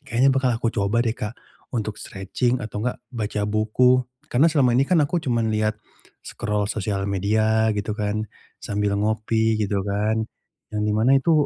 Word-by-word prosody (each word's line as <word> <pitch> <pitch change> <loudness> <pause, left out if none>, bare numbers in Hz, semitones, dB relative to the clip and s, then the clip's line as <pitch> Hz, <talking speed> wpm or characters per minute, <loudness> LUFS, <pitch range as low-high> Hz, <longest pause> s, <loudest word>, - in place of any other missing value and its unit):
kayaknya 135 -1 +2
bakal 130 -3 +1
aku 115 0 -1
coba 105 +3 +1
deh, 115 - +1
Kak, 110 0 -6 0.4
untuk 110 -2 -3
stretching, 110 +6 -1
atau 105 -1 -5
nggak, 125 +3 -1 0.2
baca 105 -2 -2
buku. 110 +5 +3 0.3
Karena, 145 +7 +5
selama 135 -6 +3
ini 135 +3 +2
kan, 185 - +4
aku 170 +4 -1
cuman 115 -6 0
liat 110 0 0 0.5
scroll 105 -1 -2
sosial 100 -2 -2
media, 110 +3 +2
gitu 105 +1 -2
kan, 105 +1 -1 0.4
sambil 100 0 -1
ngopi, 110 +1 +1
gitu 100 -1 0
kan. 105 +2 0 0.5
Yang 105 - -1
di 105 - +1
mana, 110 +5 +2
itu, 135 +5 +2
110 Hz, 170 wpm, -23 LUFS, 105-120 Hz, 0.5 s, Karena